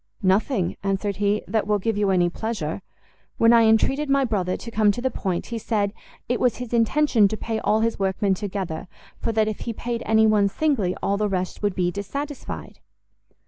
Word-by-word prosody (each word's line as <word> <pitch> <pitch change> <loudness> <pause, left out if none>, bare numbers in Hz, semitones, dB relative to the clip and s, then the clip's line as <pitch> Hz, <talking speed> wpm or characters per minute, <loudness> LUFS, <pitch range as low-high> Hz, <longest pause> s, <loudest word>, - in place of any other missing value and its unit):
"Nothing," 190 0 +1
answered 195 0 -1
he, 205 +1 +1
"that 215 +1 0
will 210 0 +2
give 220 +2 -1
you 205 -1 +1
any 180 -2 +3
pleasure. 200 -3 -3 0.6
When 230 +1 +5
I 230 -1 +6
entreated 270 +7 +2
my 275 -1 +3
brother 190 -6 -1
to 230 - -9
come 215 -2 +3
to - - -5
the 260 +1 -1
point, 185 -6 -2
he 230 - -2
said 205 -2 -1 0.3
it 245 0 0
was 250 -2 +2
his 245 -1 -6
intention 235 -1 +3
to 215 - -4
pay 225 0 -3
all 215 +1 +1
his 230 -1 0
workmen 195 +1 +1
together, 190 -3 -4 0.3
for - - -1
that 220 -1 +2
if 215 - -3
he 235 - -4
paid 235 +1 -4
any 220 0 +5
one 210 -2 +4
singly, 225 -8 0
all 200 - +1
the 210 0 0
rest 185 -1 -3
would 205 -3 0
be 175 -1 +1
dissatisfied." 280 +10 -6
215 Hz, 200 wpm, -24 LUFS, 195-230 Hz, 0.6 s, I